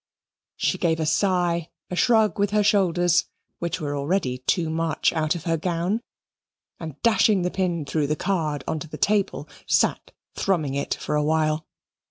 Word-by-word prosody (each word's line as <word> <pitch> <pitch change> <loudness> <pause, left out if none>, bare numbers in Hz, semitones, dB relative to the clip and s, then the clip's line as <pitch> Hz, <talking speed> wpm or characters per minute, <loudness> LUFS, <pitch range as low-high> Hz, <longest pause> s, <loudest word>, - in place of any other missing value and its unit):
She - - 0
gave 165 -2 +1
a 160 - 0
sigh, 175 0 +1 0.2
a - - -2
shrug 220 -1 +3
with 205 0 +2
her 210 0 +2
shoulders, 175 -4 +3 0.3
which 170 -1 -2
were 145 -2 -3
already 140 -3 -1
too 165 +4 0
much 165 0 0
out 155 0 0
of 165 - -6
her 165 -1 0
gown, 175 +6 -1 0.8
and 160 -4 -7
dashing 215 -4 +4
the 180 - -1
pin 175 -5 -1
through 150 0 -1
the 150 - 0
card 155 -6 -1
on 160 -1 -1
to 160 - -7
the - - -8
table, 205 -1 0 0.2
sat - - +1 0.2
thrumming 160 -8 0
it 140 0 -1
for - - -4
a 150 0 +2
while. 155 0 0
170 Hz, 175 wpm, -24 LUFS, 155-190 Hz, 0.8 s, dashing